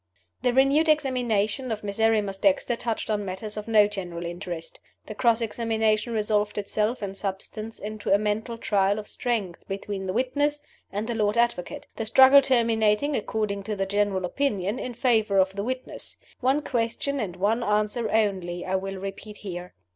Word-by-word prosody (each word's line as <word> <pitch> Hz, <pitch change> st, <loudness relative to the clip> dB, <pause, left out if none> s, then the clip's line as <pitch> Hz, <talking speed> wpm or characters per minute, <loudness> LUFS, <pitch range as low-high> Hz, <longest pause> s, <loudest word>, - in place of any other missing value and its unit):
The 250 Hz, 0 st, +2 dB
renewed 275 Hz, +5 st, +4 dB
examination 250 Hz, -5 st, +1 dB
of 215 Hz, -1 st, -3 dB
Miserrimus 205 Hz, -1 st, +1 dB
Dexter 280 Hz, -3 st, +2 dB
touched 230 Hz, -2 st, -3 dB
on 210 Hz, -1 st, 0 dB
matters 200 Hz, +2 st, -5 dB
of 210 Hz, 0 st, -6 dB
no 215 Hz, -2 st, +6 dB
general 180 Hz, -4 st, -5 dB
interest. 175 Hz, -1 st, -6 dB, 0.3 s
The 215 Hz, -, -7 dB
cross 235 Hz, +1 st, +2 dB
examination 225 Hz, 0 st, 0 dB
resolved 210 Hz, -1 st, 0 dB
itself, 210 Hz, +3 st, -1 dB
in 195 Hz, -1 st, -3 dB
substance, 205 Hz, +3 st, -5 dB
into 215 Hz, 0 st, -4 dB
a 200 Hz, -, +7 dB
mental 215 Hz, +3 st, -2 dB
trial 200 Hz, -2 st, +1 dB
of 210 Hz, -1 st, -6 dB
strength 215 Hz, -8 st, -2 dB
between 195 Hz, 0 st, -4 dB
the 185 Hz, -, -1 dB
witness 290 Hz, +5 st, +1 dB, 0.3 s
and 205 Hz, +2 st, -2 dB
the 235 Hz, -, -2 dB
Lord 215 Hz, 0 st, +1 dB
Advocate; 235 Hz, -7 st, 0 dB
the 225 Hz, -, -2 dB
struggle 265 Hz, +4 st, +8 dB
terminating 230 Hz, +1 st, +2 dB
(according 210 Hz, -2 st, -2 dB
to 210 Hz, +2 st, -4 dB
the 195 Hz, -1 st, -1 dB
general 200 Hz, -1 st, 0 dB
opinion) 210 Hz, -1 st, -1 dB
in 250 Hz, -1 st, -5 dB
favor 220 Hz, -5 st, +2 dB
of 190 Hz, 0 st, +3 dB
the 200 Hz, -, -2 dB
witness. 255 Hz, +3 st, -5 dB, 0.2 s
One 270 Hz, +3 st, +2 dB
question 245 Hz, +3 st, -1 dB
and 185 Hz, -7 st, -3 dB
one 210 Hz, +6 st, +1 dB
answer 215 Hz, +1 st, 0 dB
only 185 Hz, -5 st, 0 dB
I 190 Hz, +1 st, 0 dB
will 195 Hz, 0 st, -5 dB
repeat 195 Hz, +2 st, -7 dB
here. 180 Hz, -3 st, -7 dB
215 Hz, 170 wpm, -26 LUFS, 195-235 Hz, 0.3 s, struggle